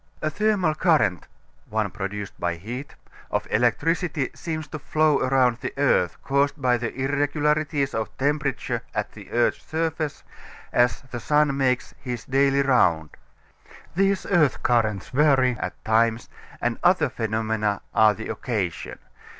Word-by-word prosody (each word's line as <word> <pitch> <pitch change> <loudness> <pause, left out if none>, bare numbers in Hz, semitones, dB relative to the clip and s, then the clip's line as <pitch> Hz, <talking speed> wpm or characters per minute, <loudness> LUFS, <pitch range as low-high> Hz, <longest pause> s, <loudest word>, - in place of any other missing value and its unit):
A 155 - -1
thermal 205 -4 +1
current 155 - +2 0.4
(one 110 -2 -1
produced 105 0 -5
by 85 0 -1
heat) 120 - -7 0.3
of - - -1
electricity 145 - +1
seems 155 -2 -5
to 155 - -6
flow 155 0 +2
around 130 -2 +2
the - - -6
earth 135 -11 +2
caused 140 +2 +1
by 125 -2 +3
the 120 -1 -3
irregularities 145 +1 0
of 110 -1 -4
temperature 145 0 -1
at - - -2
the - - -13
earth's - - +1
surface, 160 -2 -3 0.5
as 120 +2 +2
the 120 - -4
sun 150 +2 +2
makes 130 -2 0
his 125 -3 -5
daily 140 +1 +3
round. 85 - +2 0.8
These 195 +1 +1
earth 155 -8 +2
currents 110 -5 +1
vary 135 -3 +3
at - - -6
times, 115 +1 +2 0.3
and 120 -1 -1
other 175 -3 +4
phenomena 110 -3 -1
are 110 -1 +5
the 110 - -7
occasion. 95 - -3
135 Hz, 135 wpm, -24 LUFS, 110-150 Hz, 0.8 s, are